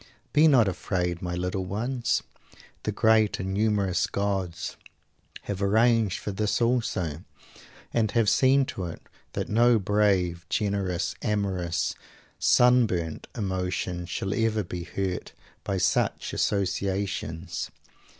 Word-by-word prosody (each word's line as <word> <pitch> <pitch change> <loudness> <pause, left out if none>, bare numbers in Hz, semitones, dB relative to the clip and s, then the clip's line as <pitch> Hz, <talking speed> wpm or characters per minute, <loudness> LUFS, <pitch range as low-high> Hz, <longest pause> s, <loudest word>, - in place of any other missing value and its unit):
Be 150 +2 +6
not 125 -8 +5
afraid 90 -2 -2
my 90 -1 -3
little 90 +2 -2
ones! 120 +6 -1 0.6
The - - +1
great 110 -1 +3
and 95 +1 -3
humorous 100 -4 +1
gods 95 -4 -2 0.7
have 100 -1 -4
arranged 110 0 +3
for 105 - -4
this 105 +2 0
also; 105 - 0 0.7
and 110 -2 +2
have 115 0 +2
seen 135 +4 +4
to 95 -7 -5
it 85 - -6 0.3
that - - -2
no 120 +2 +4
brave, 95 -4 +1
generous, 100 -4 -1
amorous 95 -5 -1 0.5
"sunburnt" 115 -10 +3
emotion 90 -3 -2
shall 95 +3 -2
ever 110 -1 +1
be 90 -1 -6
hurt 95 0 -3 0.3
by 100 - -1
such 90 -1 0
associations! 95 -4 -1
100 Hz, 115 wpm, -27 LUFS, 90-110 Hz, 0.7 s, Be